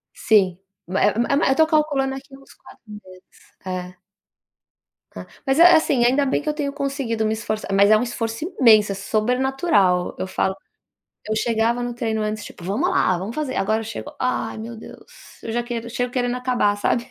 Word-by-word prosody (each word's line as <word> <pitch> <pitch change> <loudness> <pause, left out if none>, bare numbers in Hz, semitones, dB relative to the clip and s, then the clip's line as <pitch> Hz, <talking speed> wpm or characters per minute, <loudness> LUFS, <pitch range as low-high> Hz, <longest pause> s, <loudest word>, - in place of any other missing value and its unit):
Sim, 190 -5 +2 0.3
é 190 +3 +2
uma 235 - +1
é 280 - +3
uma 290 - +2
eu 265 - +3
tô 315 +2 +4
calculando 295 -4 +1
aqui 270 0 -11
uns 275 - -18
4 - - -18
meses 210 -3 -12 0.5
é. 180 -1 -5 1.2
Ah, - - -8 0.2
mas 270 +2 +1
é 350 +1 +8
assim, 280 -6 +2
ainda 265 +4 +3
bem 270 - 0
que 300 - -3
eu - - 0
tenho 290 -2 -3
conseguido 275 -6 -2
me 215 - +1
esforçar, 215 -1 -4
mas 200 +1 +5
é 215 - +6
um 220 - 0
esforço 230 +2 -4
imenso 215 -5 +6
é - - -3
sobrenatural. 215 - +1
Eu - - -4
falo 190 0 -1 0.7
eu 215 - 0
chegava 230 +2 0
no 240 0 -3
treino 225 -2 -2
antes 215 0 -3
tipo: - - -12
"Vamos 195 +4 0
lá, 185 - +2
vamos 195 +6 -6
fazer!" 295 -4 -3
Agora 215 +3 0
eu - - -6
chego: 255 +7 -8
"Ai 255 -2 -2
meu 230 +2 -7
deus." 220 - -15
Eu 225 - -5
já 240 +1 -1
quero 235 -1 -5
chego 245 +1 -2
querendo 245 -1 -1
acabar, 250 -5 +1
sabe? 235 +3 0
235 Hz, 200 wpm, -22 LUFS, 210-270 Hz, 1.2 s, é